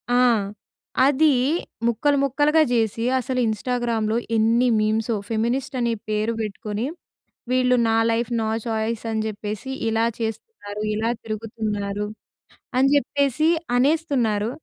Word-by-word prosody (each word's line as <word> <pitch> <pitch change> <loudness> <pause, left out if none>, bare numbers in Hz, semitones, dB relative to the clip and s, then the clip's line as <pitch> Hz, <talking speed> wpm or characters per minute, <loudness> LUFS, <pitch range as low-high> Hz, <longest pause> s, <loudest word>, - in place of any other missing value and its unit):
ఆ! - - +4 0.9
అదీ 290 +3 +4 0.6
ముక్కలు 280 +5 +2
ముక్కలుగా 290 +4 +3
జేసి 225 -1 +1
అసలు 255 0 -2
ఇన్‌స్టా‌గ్రా‌మ్‌లో 225 0 -1 0.2
ఏన్ని 230 +3 +3
మీమ్సో 220 +2 +1
ఫెమినిస్ట్ 235 +4 -1
అనే 235 -1 +1 0.2
పేరు 215 +2 0
పెట్టుకొని 210 +1 -4 0.7
వీళ్ళు 255 0 +3
నా 225 - +2
లైఫ్ 230 0 0
నా 220 - -1 0.2
చాయిస్ 225 0 -2
అని 220 0 0
చెప్పేసి 210 +3 -5 0.2
ఇలా 225 +1 +2
చేస్తున్నారు, 220 - -5
ఇలా 220 +2 0
తిరుగుతున్నారు 210 -2 -3 0.7
అని 265 +1 +5
చెప్పేసి 285 +2 +2 0.3
అనేస్తున్నారు. 250 -7 +1
230 Hz, 110 wpm, -23 LUFS, 215-255 Hz, 0.9 s, అని